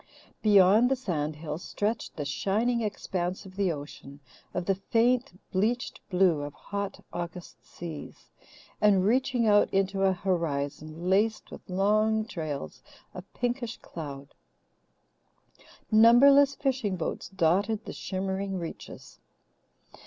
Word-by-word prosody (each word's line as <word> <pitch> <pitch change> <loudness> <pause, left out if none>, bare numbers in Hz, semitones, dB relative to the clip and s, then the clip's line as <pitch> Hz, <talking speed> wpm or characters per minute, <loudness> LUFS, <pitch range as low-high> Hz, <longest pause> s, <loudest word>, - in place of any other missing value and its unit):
Beyond 210 +3 +6
the 270 - +2
sand 155 - -3
hills 150 +1 -6
stretched 215 +3 -3
the 145 - -4
shining 220 +11 0
expanse 185 -4 -3
of 190 -1 -12
the 195 -3 +1
ocean, 145 -2 -9 0.3
of 180 - -3
the 195 - +2
faint, 230 +1 +1
bleached 220 +6 -1
blue 180 -5 +3
of 145 0 -6
hot 200 -1 -5
August 175 0 -7
seas, 165 -4 -9 0.5
and 195 -3 +4
reaching 250 +1 +2
out 205 -1 +4
into 195 0 0
a 195 0 +4
horizon 160 -2 -3
laced 210 +4 +1
with - - -11
long 215 +3 +2
trails 155 - -5 0.3
of 185 +1 -10
pinkish 240 -1 -2
cloud. 140 -3 -9 1.6
Numberless 275 +6 +7
fishing 255 -8 -1
boats 175 - -4
dotted 195 +4 +1
the - - -6
shimmering 190 0 -3
reaches. 170 -2 -9
195 Hz, 120 wpm, -28 LUFS, 170-220 Hz, 1.6 s, Numberless